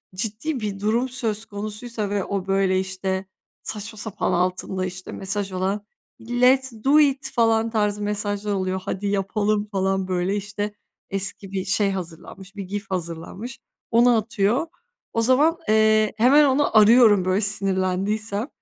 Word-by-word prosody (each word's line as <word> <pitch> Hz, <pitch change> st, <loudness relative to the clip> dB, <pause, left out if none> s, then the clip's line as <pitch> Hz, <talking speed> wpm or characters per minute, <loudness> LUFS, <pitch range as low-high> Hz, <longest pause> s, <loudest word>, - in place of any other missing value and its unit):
ciddi 230 Hz, +8 st, -3 dB
bir 205 Hz, -2 st, -4 dB
durum 230 Hz, +5 st, +1 dB
söz 225 Hz, -3 st, -3 dB
konusuysa 210 Hz, +1 st, -5 dB
ve 200 Hz, -2 st, -1 dB
o 195 Hz, -2 st, -3 dB
böyle 195 Hz, -1 st, +2 dB
işte 190 Hz, 0 st, -3 dB, 0.4 s
saçma 215 Hz, +1 st, -6 dB
sapan 210 Hz, -1 st, -2 dB
altında 185 Hz, +1 st, -1 dB
işte 185 Hz, 0 st, -7 dB
mesaj 195 Hz, 0 st, -3 dB
olan, 195 Hz, +3 st, -2 dB, 0.4 s
let's 250 Hz, +2 st, +3 dB
do 290 Hz, +3 st, +5 dB
it! 280 Hz, -2 st, +2 dB
Falan 225 Hz, -1 st, +2 dB
tarzı 210 Hz, -2 st, 0 dB
mesajlar 205 Hz, 0 st, -2 dB
oluyor. 185 Hz, -1 st, -1 dB
Hadi 200 Hz, 0 st, -3 dB
yapalım 205 Hz, +1 st, 0 dB
falan, 190 Hz, -1 st, 0 dB
böyle, 185 Hz, +1 st, 0 dB
işte 205 Hz, +1 st, -4 dB, 0.4 s
eski 195 Hz, 0 st, -4 dB
bir 190 Hz, -1 st, -3 dB
şey 200 Hz, +1 st, +2 dB
hazırlanmış, 185 Hz, +2 st, -8 dB
bir 200 Hz, -, -5 dB
GIF 200 Hz, +3 st, -5 dB
hazırlanmış, 180 Hz, +6 st, -5 dB, 0.3 s
onu 240 Hz, +1 st, +5 dB
atıyor. 220 Hz, +6 st, 0 dB, 0.5 s
O 230 Hz, -, +1 dB
zaman, 285 Hz, +8 st, +3 dB
eee, 215 Hz, 0 st, +4 dB
hemen 275 Hz, +6 st, +6 dB
onu 275 Hz, -4 st, +2 dB
arıyorum 215 Hz, -3 st, +6 dB
böyle 185 Hz, +2 st, +1 dB
sinirlendiysem. 200 Hz, +2 st, -1 dB
205 Hz, 140 wpm, -23 LUFS, 190-225 Hz, 0.5 s, hemen